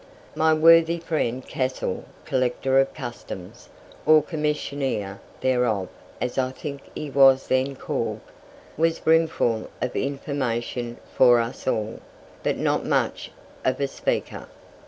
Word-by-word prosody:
My 160 0 +3
worthy 165 +1 +6
friend 150 -7 -2
Cassell, 130 0 -2 0.2
Collector 130 +1 +1
of 135 - +2
Customs 120 -9 -8 0.3
(or 155 -1 +6
Commissioner 145 - -2 0.2
thereof, 125 -7 +1 0.3
as 125 +2 -2
I 130 -1 +1
think 140 +1 -7
he 150 -2 -5
was 135 -1 +6
then 130 +1 +1
called), - - -3 0.6
was 165 +1 +2
brimful 160 -8 +2
of 125 - -3
information 125 -4 -2 0.2
for 120 -2 +6
us 115 +1 -4
all, 110 -3 -1 0.4
but - - 0
not - - +1
much - - 0 0.3
of 130 - 0
a 140 - +1
speaker. - - -3
135 Hz, 120 wpm, -24 LUFS, 120-150 Hz, 0.6 s, worthy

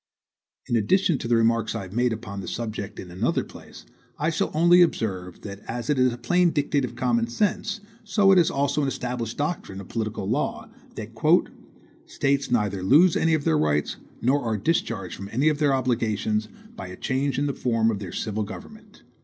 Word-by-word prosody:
In 120 - -1
addition 150 - +2
to - - -4
the 120 - +3
remarks 115 -1 +2
I - - -3
have 95 0 -10
made 120 +1 +2
upon 105 -3 -5
the 90 - -8
subject 105 -2 -5
in 90 - -8
another 90 - 0
place, - - -13 0.3
I 155 +3 0
shall 160 - 0
only 175 +3 +5
observe 95 - 0
that 100 -1 -8
as 120 +3 -3
it 140 - +1
is 130 0 +4
a 120 - -6
plain 175 +9 +2
dictate 145 -2 0
of 125 - -4
common 120 -2 +1
sense, 205 - -1 0.2
so 205 -2 +3
it 190 - +7
is 170 - +3
also 140 +1 0
an 140 - 0
established 125 -3 -3
doctrine 145 - -3
of 100 - -10
political 110 -2 -3
law, - - -2 0.2
that - - -7 1.0
"States 140 0 0
neither 105 -5 0
lose 155 - +5
any 165 0 +3
of 150 - -2
their 80 -1 +2
rights, 75 -1 0 0.3
nor 135 +4 +3
are 110 -2 -1
discharged 105 - -1
from 100 0 -8
any 135 +7 +3
of 150 -1 -1
their 145 -2 +3
obligations, 110 -4 0 0.3
by 95 - -7
a 90 0 -9
change 135 +2 -1
in 140 - +1
the 140 - -1
form 115 -3 +1
of 105 - -3
their 95 -4 -7
civil 110 0 -3
government." 210 - -9
120 Hz, 200 wpm, -25 LUFS, 105-145 Hz, 1.0 s, it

